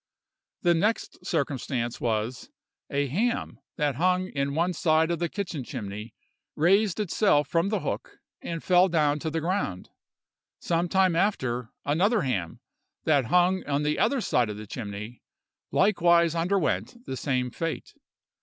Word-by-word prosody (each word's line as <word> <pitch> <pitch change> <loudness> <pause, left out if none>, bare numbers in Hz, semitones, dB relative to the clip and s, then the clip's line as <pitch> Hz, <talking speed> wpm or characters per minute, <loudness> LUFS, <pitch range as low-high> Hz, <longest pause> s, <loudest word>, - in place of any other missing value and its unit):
"The 175 -1 +5
next 210 +7 -1
circumstance 130 -4 -2
was, 115 +1 -2 0.4
a 140 0 0
ham 215 - -1 0.2
that 145 -4 0
hung 185 +2 +1
in 140 0 -2
one 175 +3 +1
side 160 -1 +2
of 170 - -1
the 170 -1 -1
kitchen 180 -8 -4
chimney 105 0 -7 0.4
raised 195 +5 +3
itself 190 -7 +2
from 170 +3 +1
the 215 - -1
hook - - -4 0.2
and 165 -1 -5
fell 185 +1 +5
down 150 -3 +2
to 160 - -3
the 165 +1 -2
ground. 165 - -2 0.7
Some 170 +1 0
time 190 -2 +3
after, 130 - 0 0.2
another 190 +10 +2
ham, 95 - -2 0.4
that 145 -5 +3
hung 180 +7 +3
on 145 0 0
the 150 +1 0
other 265 +2 +2
side 120 - +1
of 105 - -5
the 105 - -8
chimney, 105 +1 -7 0.5
likewise 170 -4 +4
underwent 195 +7 -1
the 130 - -4
same 125 -1 -1
fate. 165 +3 -4
160 Hz, 145 wpm, -27 LUFS, 130-185 Hz, 0.7 s, The